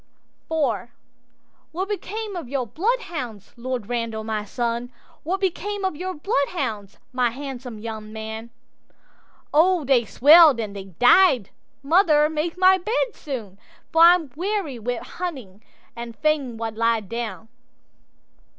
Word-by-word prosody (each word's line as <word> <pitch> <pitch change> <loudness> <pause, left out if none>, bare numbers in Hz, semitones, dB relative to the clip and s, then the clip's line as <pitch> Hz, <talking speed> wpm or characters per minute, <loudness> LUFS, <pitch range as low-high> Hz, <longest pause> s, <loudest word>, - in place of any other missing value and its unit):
'IV'What 295 - -5
became 420 0 -4
of 330 -9 -6
your 270 -2 -1
bloodhounds, 300 - -3
Lord 245 -3 -4
Randal, 230 -2 -3
my 215 -1 -3
son? 235 +2 -3 0.3
What 370 +5 -2
became 395 +1 -2
of 375 - -1
your 370 +4 -4
bloodhounds, 275 - -2 0.2
my 250 -1 +2
handsome 255 -2 -7
young 215 -1 -7
man?'—'O 235 +9 -3
they 260 -3 +4
swell'd 295 +3 +7
and 210 -3 -4
they 195 -1 -7
died; 245 - +4 0.3
mother, 305 -1 +4
make 315 +3 -2
my 375 +1 +5
bed 450 +5 -1
soon, 220 -9 -7 0.3
For 325 -1 +3
I'm 335 -4 +6
weary 360 - -2
wi' 240 +2 -3
hunting, 260 - -7 0.3
and 235 -1 -7
fain 290 -6 0
wald 225 -1 -5
lie 230 -1 +2
down. 220 0 -6
260 Hz, 125 wpm, -23 LUFS, 225-345 Hz, 0.3 s, swell'd